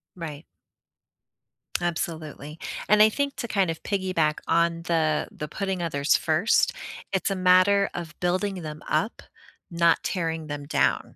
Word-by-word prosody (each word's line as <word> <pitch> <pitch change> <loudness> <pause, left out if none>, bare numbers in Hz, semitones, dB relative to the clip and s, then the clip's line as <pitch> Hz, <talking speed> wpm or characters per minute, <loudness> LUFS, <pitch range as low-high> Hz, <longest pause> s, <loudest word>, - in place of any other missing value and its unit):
Right. 155 -3 -7 1.4
Absolutely, 160 -2 -4 0.3
and 210 +2 +5
I 215 - +8
think 280 +4 -2
to 235 - -3
kind 195 -6 +1
of 160 - -7
piggyback 185 -6 0
on 170 0 +2
the 160 -3 +1
the 150 - -6
putting 190 +2 -3
others 145 -3 +2
first, 160 +7 +2 0.4
it's 195 +1 0
a - - 0
matter 185 +2 +4
of 170 -3 -5
building 185 +2 -1
them 155 -1 -7
up, 160 +9 -1 0.5
not 170 0 +3
tearing 165 -3 -2
them 145 -1 -5
down. 150 - 0
170 Hz, 140 wpm, -26 LUFS, 155-190 Hz, 1.4 s, I